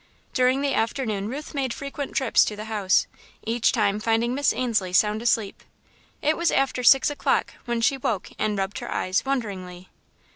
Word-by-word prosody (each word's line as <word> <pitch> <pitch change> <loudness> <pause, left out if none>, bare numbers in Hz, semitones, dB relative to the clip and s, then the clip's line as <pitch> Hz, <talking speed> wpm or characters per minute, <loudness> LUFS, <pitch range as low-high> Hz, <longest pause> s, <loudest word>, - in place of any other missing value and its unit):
During 255 +1 +2
the 280 -1 +1
afternoon 220 -4 -1
Ruth 285 +6 -6
made 265 -4 -2
frequent 280 0 -6
trips 265 - +4
to 210 - -4
the 210 +1 -7
house, 210 -4 +2 0.4
each 230 +1 +1
time 210 -3 +1
finding 225 +2 +1
Miss 285 +1 +2
Ainslie 210 -8 -1
sound 210 +3 +3
asleep. 225 -4 0 0.6
It 310 +2 +3
was 340 0 +1
after 270 -2 +1
six 270 +4 +5
o'clock 290 - 0
when 235 -1 -1
she 270 +4 +2
woke 225 -7 -3
and 210 -1 0
rubbed 195 +1 -2
her - - -7
eyes, 185 +2 0
wonderingly. 190 -9 -4
230 Hz, 175 wpm, -24 LUFS, 210-265 Hz, 0.6 s, six